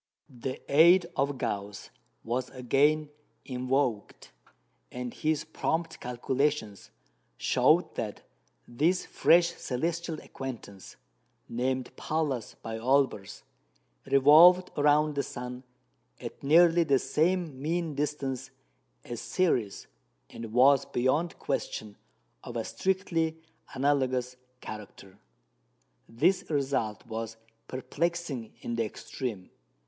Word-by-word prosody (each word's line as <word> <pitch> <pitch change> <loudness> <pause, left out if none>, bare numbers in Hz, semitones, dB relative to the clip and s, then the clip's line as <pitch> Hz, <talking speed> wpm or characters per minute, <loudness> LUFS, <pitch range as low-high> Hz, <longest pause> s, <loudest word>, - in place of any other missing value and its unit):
The 130 +2 -5
aid 170 +5 +6
of 140 0 0
Gauss 100 -4 -4 0.3
was 125 +2 -2
again 145 +4 +1 0.3
invoked, 125 -3 -2 0.6
and 125 -1 -5
his 155 -1 0
prompt 160 +1 -2
calculations 125 -2 -2 0.5
showed - - +3
that - - -5 0.4
this 165 +9 +1
fresh 170 +1 +4
celestial 165 +2 -3
acquaintance 115 -7 -8 0.5
(named 130 +1 -2
"Pallas" 150 -7 -2
by 115 0 -5
Olbers), 130 -5 0 0.6
revolved 165 +7 +7
round 150 +1 +3
the 140 - 0
sun 125 -1 -7 0.6
at - - -8
nearly 170 +3 +5
the 140 -4 +3
same 155 +1 0
mean 165 +1 -1
distance 135 -3 -3 0.6
as 120 -1 -6
Ceres, 125 - 0 0.5
and 115 -1 -8
was 135 +3 +5
beyond 145 +7 0
question 105 -2 -3 0.5
of 120 - -6
a 115 - -2
strictly 165 -4 -1 0.4
analogous 130 -2 +1 0.3
character. 100 -2 -10 0.9
This 165 +12 +1
result 135 -8 -1
was 115 -1 -5 0.3
perplexing 145 -2 -3
in 120 - -4
the 115 - +2
extreme. 110 -3 -6
135 Hz, 100 wpm, -29 LUFS, 120-160 Hz, 0.9 s, revolved